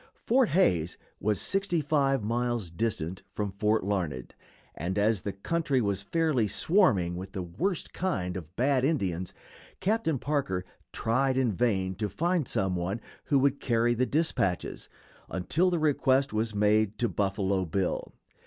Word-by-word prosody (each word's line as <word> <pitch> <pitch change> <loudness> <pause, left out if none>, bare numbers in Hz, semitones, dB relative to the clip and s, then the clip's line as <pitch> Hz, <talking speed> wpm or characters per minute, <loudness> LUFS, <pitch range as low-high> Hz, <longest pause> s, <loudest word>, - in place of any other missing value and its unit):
Fort 250 -1 +4
Hays 90 - +2 0.2
was 105 -2 0
sixty 195 -3 0
five 140 -4 +1
miles 120 -4 -1
distant 95 -3 -2
from 105 -2 -3
Fort 105 +2 +1
Larned, 90 -10 -2 0.4
and, 90 +5 -3
as 105 -1 +2
the 100 - -3
country 145 - 0
was 100 -4 0
fairly 145 -1 +1
swarming 105 - +3
with 95 +1 -7
the 95 -3 -3
worst 160 - -2
kind 90 - -2
of 90 -1 -8
"bad" 130 +1 +2
Indians, 95 - 0 0.5
Captain 190 -6 +1
Parker 130 -11 -1 0.3
tried 130 +3 +1
in 130 -4 +2
vain 95 -3 0
to 105 0 -2
find 170 - 0
some 95 -1 0
one 90 +5 -2 0.3
who 140 - +3
would 140 +1 +2
carry 120 0 +2
the 125 +2 +1
dispatches, 140 - -1 0.4
until 155 - +1
the 175 - 0
request 140 -4 +2
was 110 0 -1
made 105 0 +2
to 120 - +1
Buffalo 100 -2 0
Bill. 90 +2 -2
110 Hz, 150 wpm, -28 LUFS, 95-140 Hz, 0.5 s, Fort